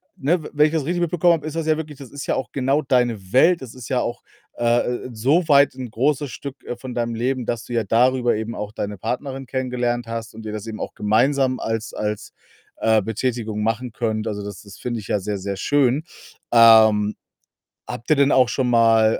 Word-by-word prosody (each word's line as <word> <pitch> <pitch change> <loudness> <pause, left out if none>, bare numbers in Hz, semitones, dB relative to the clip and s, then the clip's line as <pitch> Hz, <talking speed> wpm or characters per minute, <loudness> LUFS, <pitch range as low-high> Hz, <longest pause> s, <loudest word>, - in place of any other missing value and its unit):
ne, 160 +5 +1
we - - -8
wenn 150 +1 +5
ich - - -4
das 155 -4 -1
richtig 175 +1 -1
mitbekommen 175 0 +3
habe, 155 -2 -3
ist 155 - -6
das 165 - -1
ja 155 - +4
wirklich 150 -3 -7
das 135 -3 -11
ist 140 -1 -7
ja - - 0
auch 130 - -4
genau 135 +2 +1
deine 120 -7 0
Welt, 170 +6 +5
das 125 -3 -9
ist 125 -3 -10
ja 130 -2 +1
auch, 120 +1 -3 0.3
äh, 120 +1 0
so 140 +10 +1
weit 140 -1 +5
'n 130 -3 -6
großes 140 +4 0
Stück, 140 +1 -8
äh, 120 - -5
von 125 0 -7
deinem 120 -1 -1
Leben, 125 +1 -1
dass 120 -1 -3
du 120 - -7
ja 115 - +1
darüber 120 +3 +2
eben 110 +2 -4
auch 105 0 -5
deine 105 -2 -5
Partnerin 135 +5 -4
kennengelernt 125 -2 -2
hast 115 -1 -5
und 110 0 -10
ihr 105 - -5
das 105 0 -5
eben 110 - -6
auch - - -5
gemeinsam 130 +5 +1
als 115 0 -3
als, 105 -1 -4 0.5
äh, 110 -1 +3
Betätigung 110 0 -2
machen 115 +2 -1
könnt. 110 -1 -2
Also, 105 -1 -4
das 100 -3 -8
das 100 -2 -13
finde 120 -3 -4
ich - - -12
ja 105 - +1
sehr, 100 +1 -3
sehr 100 0 -4
schön. 140 +4 +2 0.5
Ähm, 110 -2 +6 0.7
habt 115 - -7
ihr 155 - +5
denn 140 0 +4
auch 125 -3 +4
schon 130 -2 0
mal 115 -1 +4
120 Hz, 220 wpm, -22 LUFS, 110-135 Hz, 0.7 s, Ähm